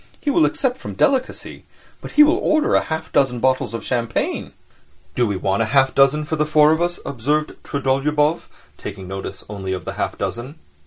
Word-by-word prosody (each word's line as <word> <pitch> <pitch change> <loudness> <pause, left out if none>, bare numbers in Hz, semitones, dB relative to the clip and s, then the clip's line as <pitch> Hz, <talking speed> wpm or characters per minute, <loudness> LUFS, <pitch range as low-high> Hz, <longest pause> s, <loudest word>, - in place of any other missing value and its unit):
He 290 - -1
will 330 +2 +4
accept 255 -2 0
from - - -7
delicacy, 265 -2 -1 0.4
but - - -9
he 300 - +8
will 315 +4 +3
order 310 -5 +2
half 160 0 -4
a - - -31
dozen 125 -3 +2
bottles 130 -3 0
of 115 - -6
champagne." 120 -2 -2 0.6
"Do 120 -2 +1
we 100 - -1
want 95 +3 0
half 130 +4 +3
a - - -19
dozen 140 +2 +3
for 160 +1 -3
the 150 - +1
four 150 0 +5
of 160 +1 +1
us?" 175 0 -1
observed 145 +4 -1
Trudolyubov, 145 +3 0 0.3
taking 95 -2 -8
notice 95 +1 -7
only 95 -2 -4
of 95 - -5
the - - -4
half - - -3
dozen. 125 +5 -4
140 Hz, 195 wpm, -20 LUFS, 115-160 Hz, 0.6 s, he